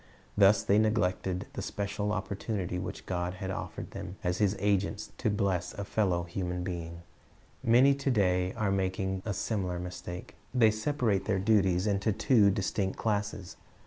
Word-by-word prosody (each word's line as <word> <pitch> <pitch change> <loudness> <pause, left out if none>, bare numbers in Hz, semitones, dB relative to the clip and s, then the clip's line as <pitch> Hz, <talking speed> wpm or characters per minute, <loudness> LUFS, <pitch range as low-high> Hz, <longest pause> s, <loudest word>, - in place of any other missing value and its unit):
Thus 100 0 +5
they 100 +2 +4
neglected 95 -4 0
the - - -4
special 105 +1 -2
opportunity 100 -2 -3
which 90 - -6
God 90 0 -2
had 95 +1 -4
offered - - -6
them 90 - -7
as 90 -1 0
His 105 -1 +2
agents 100 -1 0
to - - +1
bless 100 -3 0
a 100 - -4
fellow 95 -5 +1 0.4
being. 85 -2 -5 0.6
Many 125 +4 +6
to 140 0 -2
day 90 -6 +2
are 105 -3 0
making 95 0 -1
a 100 - 0
similar 95 -3 -2
mistake. 90 0 -7 0.2
They 115 -3 +6
separate 110 -3 0
their 95 - +1
duties 95 -2 +3
into 100 +1 +1
two 105 -1 +4
distinct 100 -1 -1
classes. 105 -3 -2
100 Hz, 150 wpm, -30 LUFS, 90-105 Hz, 0.6 s, Many